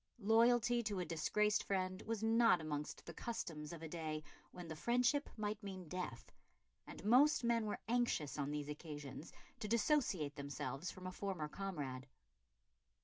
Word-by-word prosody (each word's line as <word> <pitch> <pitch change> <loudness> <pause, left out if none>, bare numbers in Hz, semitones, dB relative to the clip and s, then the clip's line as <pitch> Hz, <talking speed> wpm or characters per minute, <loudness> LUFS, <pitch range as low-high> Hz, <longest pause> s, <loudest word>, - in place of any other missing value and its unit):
Loyalty 235 +2 +4
to 210 -4 -2
a 180 - -1
disgraced 205 +7 +2
friend 185 0 -1
was 225 -1 -1
not 225 -3 +5
amongst 150 -2 -4
the - - -7
customs 160 -10 -4
of 165 -1 -8
a - - -3
day 155 -1 -3 0.3
when 180 -1 -8
the 160 - -5
friendship 250 - +2
might 210 0 -2
mean 190 -4 -6
death, 180 -9 -5 0.6
and - - -9
most 260 +6 +6
men 230 -2 +2
were 210 - -1
anxious, 230 - +1
on 140 0 0
these 145 -1 -2
occasions, 145 -1 -7 0.3
to 215 - -3
dissociate 215 - +2
themselves 140 +2 -3
from 185 - -9
a 185 - -3
former 185 -5 -3
comrade. 145 -8 -4
185 Hz, 155 wpm, -39 LUFS, 150-225 Hz, 0.6 s, most